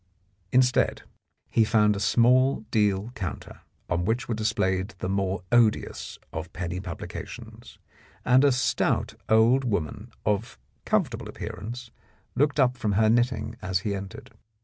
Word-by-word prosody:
Instead, 125 0 +3 0.5
he 115 - +4
found 105 -1 +3
a - - -3
small 125 +4 +3
deal 105 0 +1
counter, 95 -8 -6 0.3
on 85 - 0
which 115 +6 -1
were 120 - -1
displayed 95 -4 -1
the 95 - -4
more 95 -1 -1
odious 110 - +1 0.2
of 80 +2 -5
penny 90 0 -4
publications, 90 -3 -8 0.5
and 125 +2 +5
a 140 - +5
stout 125 +1 0 0.2
old 115 +4 +5
woman 105 - -3
of 105 +1 -1 0.3
comfortable - - 0
appearance 115 +5 -7 0.4
looked 145 +1 +1
up 130 -1 +3
from 110 -4 -1
her 110 +2 +4
knitting 120 +1 0
as 90 0 -1
he 100 0 -2
entered. 95 -1 -7
110 Hz, 135 wpm, -26 LUFS, 95-120 Hz, 0.5 s, and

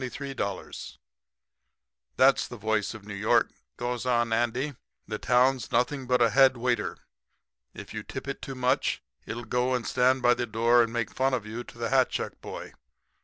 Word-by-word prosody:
$5,823 130 -6 -4
00 - - -8 1.2
"'That's 135 +1 +5
the 120 - -9
voice 110 -1 -1
of 105 -2 -11
New 105 - -7
York,' 110 +4 +2 0.3
goes 120 -1 -3
on 120 -2 +1
Andy. 125 +5 0 0.3
'The 105 +1 -4
town's 125 +1 +2
nothing 125 +2 0
but 125 -1 +4
a 115 - +3
head 135 -1 +5
waiter. 120 -2 -1 0.8
If - - -9
you - - -4
tip - - -7
it - - -4
too 135 - -6
much 130 +2 0 0.2
it'll 120 +1 -5
go 125 +2 +1
and 125 - -3
stand 130 +1 +2
by 120 0 +6
the 120 0 -2
door 115 +2 +4
and 115 -1 0
make 115 -2 -2
fun 130 0 +1
of 115 -4 -4
you 115 +3 -5
to - - -14
the 115 0 -2
hat 130 -1 +4
check - - -4
boy. - - -8
120 Hz, 185 wpm, -27 LUFS, 115-130 Hz, 1.2 s, by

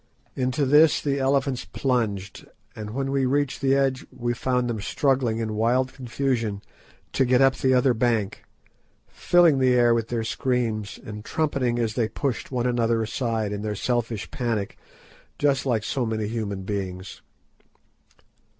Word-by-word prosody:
Into 130 +2 0
this 150 +3 +5
the 140 -1 -1
elephants 135 -1 +1
plunged, 105 -7 -2 0.3
and 105 -1 -6
when 135 +4 -2
we 135 -1 +1
reached 140 0 0
the 135 -1 +3
edge 135 -1 +1
we 120 -1 -2
found 125 0 0
them 115 -3 -3
struggling 130 -2 +1
in 110 -1 -2
wild 125 +4 +1
confusion 120 -5 -2 0.5
to 135 - +3
get 125 0 +3
up 135 0 +5
the 130 -1 +2
other 125 0 +4
bank, 115 -3 0 0.6
filling 170 -5 +3
the 130 -1 +4
air 120 -1 +5
with 115 -1 0
their 115 -1 -2
screams, 115 -4 -2
and 105 -1 -7
trumpeting 135 -4 -1
as 115 -2 0
they 115 -2 0
pushed 135 -5 -3
one 125 -2 -1
another 115 -2 +1
aside 110 -2 -2
in 105 0 -4
their 105 -1 -3
selfish 115 -1 -2
panic, 115 -6 -2 0.6
just 140 -2 +1
like 115 -4 +1
so 130 +3 -1
many 110 -2 -2
human 105 -4 -4
beings. 95 -2 -5
120 Hz, 155 wpm, -24 LUFS, 110-135 Hz, 0.6 s, this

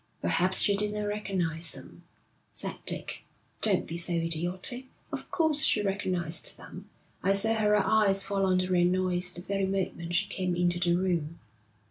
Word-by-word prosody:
'Perhaps 180 - +5
she 200 - +3
didn't 210 +1 -1
recognise 185 -6 -3
them,' - - -14 0.5
said - - -3
Dick. - - -3 0.4
'Don't - - +2
be 165 - -7
so 175 +1 +2
idiotic. 175 +9 -3 0.2
Of - - -7
course 315 -3 +2
she 210 - +4
recognised 185 -5 0
them. - - -12 0.3
I 195 +2 +2
saw 220 +3 +3
her 210 -1 +2
eyes 200 -1 +3
fall 200 -1 -2
on 185 -1 +2
the 185 0 -1
Reynolds 180 0 +1
the 175 - -8
very 195 0 -2
moment 180 -3 -3
she 200 +4 +1
came 185 -2 -3
into 175 0 0
the 175 0 +1
room.' 170 -4 -2
185 Hz, 160 wpm, -28 LUFS, 175-200 Hz, 0.5 s, Perhaps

